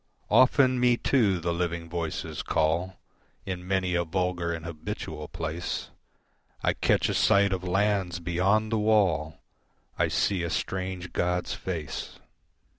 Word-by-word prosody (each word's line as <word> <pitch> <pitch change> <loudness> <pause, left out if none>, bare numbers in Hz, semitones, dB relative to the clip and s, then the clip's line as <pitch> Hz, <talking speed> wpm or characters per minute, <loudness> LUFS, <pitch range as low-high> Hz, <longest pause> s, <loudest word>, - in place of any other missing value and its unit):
Often 130 0 +5
me 125 -1 +4
too 110 -10 +2
the 85 +1 -1
Living 85 -1 -2
voices 85 -1 -4
call 85 +4 0 0.5
In 90 -1 -5
many 95 -2 0
a 85 0 +2
vulgar 90 0 -1
and 80 -1 -5
habitual 75 -2 -6
place, 80 +2 -4 0.7
I - - +3
catch - - +2
a - - -1
sight 100 -1 +4
of 90 -1 -3
lands 95 -1 +1
beyond 95 +6 +1
the 110 - +1
wall, 95 -9 +2 0.6
I - - +3
see 95 -3 +1
a 85 - -2
strange 95 0 -3
god's 90 0 0
face. 80 -7 -5
90 Hz, 135 wpm, -27 LUFS, 85-100 Hz, 0.7 s, Often